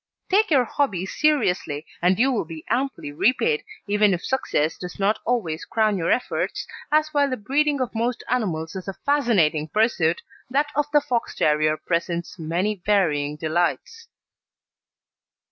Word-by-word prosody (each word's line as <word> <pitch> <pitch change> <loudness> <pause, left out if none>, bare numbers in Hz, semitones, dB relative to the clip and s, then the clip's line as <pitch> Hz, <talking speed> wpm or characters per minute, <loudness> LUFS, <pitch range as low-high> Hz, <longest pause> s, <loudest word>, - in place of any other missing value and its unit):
Take 420 +3 +4
your 275 -6 +4
hobby 215 -9 -1
seriously, 195 - 0 0.2
and 180 +2 +3
you 260 +4 +3
will 240 - 0
be 160 -1 -9
amply 260 - -1
repaid, 260 - +1 0.2
even 205 -1 +3
if 175 - -7
success 160 - 0
does 180 -1 -8
not 200 +2 +1
always 185 -10 -1
crown 215 -2 +1
your 170 -3 -1
efforts, 250 - -1 0.3
as 305 0 +3
while 285 -2 +2
the 255 - -2
breeding 285 +6 +1
of 255 - -2
most 235 +2 -1
animals 180 -9 -1
is 190 0 -6
a 195 - -3
fascinating 200 - +2
pursuit, 175 -4 +1 0.3
that 285 +3 +1
of 295 0 +1
the 295 -1 +5
Fox 245 -4 -2
terrier 155 0 +2
presents 170 +1 -3
many 180 +5 -1
varying 150 -8 +1
delights. 175 - -2
210 Hz, 150 wpm, -23 LUFS, 170-265 Hz, 0.3 s, the